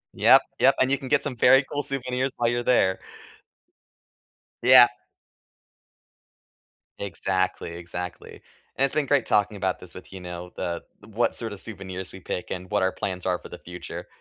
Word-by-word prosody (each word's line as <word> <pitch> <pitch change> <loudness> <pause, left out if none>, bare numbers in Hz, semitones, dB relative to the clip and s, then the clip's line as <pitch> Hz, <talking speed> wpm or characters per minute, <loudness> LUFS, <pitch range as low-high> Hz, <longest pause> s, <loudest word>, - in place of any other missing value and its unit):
Yep. - - +7 0.2
Yep. 135 +1 +5
And 130 +1 +3
you 140 - +3
can 130 - -8
get - - +2
some 140 -4 -3
very 130 +3 +6
cool 145 - -1
souvenirs 130 -1 -2
while 120 -1 +2
you're 120 0 -1
there. 95 -7 +3 1.6
Yeah. 125 0 +9 2.1
Exactly. 95 -2 -2
Exactly. 85 +1 -7 0.3
And 135 - +3
it's 135 - -3
been 150 - +2
great 140 -3 +2
talking 105 0 +1
about 95 -1 -1
this 90 -1 -13
with, 90 - -12
you 95 - -8
know, 90 0 -8
the 85 -1 -3 0.2
what 110 +2 0
sort 115 -3 -5
of 100 - -8
souvenirs 95 -4 -7
we 95 - -10
pick 90 -1 -5
and 90 +1 -6
what 105 - +2
our 95 - +2
plans 90 -1 -4
are 90 -1 +1
for - - -12
the - - -8
future. 90 0 -8
100 Hz, 175 wpm, -25 LUFS, 90-125 Hz, 2.1 s, Yeah